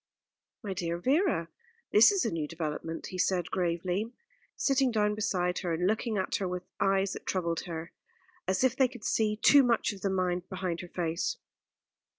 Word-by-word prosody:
"My 200 -2 -3
dear 170 -2 -2
Vera, 270 - +1 0.4
this 215 - +8
is 395 -2 +1
a - - 0
new 160 -3 -2
development," 165 0 -4
he 185 - -6
said 180 -2 +1
gravely, 180 +4 -1 0.4
sitting 270 -1 +2
down 210 -2 +1
beside 180 -4 0
her, 175 -3 -1
and 175 +2 -1
looking 220 +2 0
at 190 - 0
her 190 - -2
with 180 0 -4 0.2
eyes 195 0 +2
that - - -9
troubled 170 -3 -1
her, 165 -1 -6 0.6
as 190 +5 +1
if 260 -1 +3
they 265 -1 +4
could 245 -3 -12
see 215 -1 +1
too 280 +6 +6
much 235 -5 +2
of 195 - -11
the 200 - 0
mind 180 -2 -1
behind 185 -3 -3
her 175 - -8
face. 170 -2 -2
185 Hz, 180 wpm, -30 LUFS, 175-215 Hz, 0.6 s, this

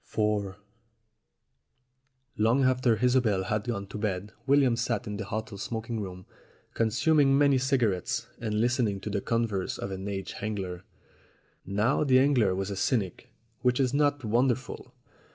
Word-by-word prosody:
IV 105 -3 0 1.8
LONG 115 +5 +3
after 130 -2 +3
Isobel 120 -7 +2
had 105 +2 -2
gone 100 -5 -3
to 105 - -8
bed 100 0 -2 0.2
William 135 -3 +4
sat 120 -1 -1
in 105 -2 -5
the - - -4
hotel 110 0 -5
smoking 115 +1 -4
room 90 -2 -7 0.5
consuming 135 +5 +3
many 140 -2 +4
cigarettes 120 -4 0
and 105 -2 -2
listening 120 -4 +1
to 105 - -5
the 100 -1 -1
converse 115 -5 -1
of 100 - -5
an 95 +1 -5
aged 95 -1 -5
angler. 95 -4 -4 0.8
Now 105 +9 +1
the 130 -3 +4
angler 130 -8 +3
was 95 +1 -3
a - - -3
cynic, 100 -1 -1 0.3
which 125 0 +1
is 130 -1 +1
not 145 -1 +1
wonderful. 125 +4 0
110 Hz, 145 wpm, -28 LUFS, 100-125 Hz, 1.8 s, William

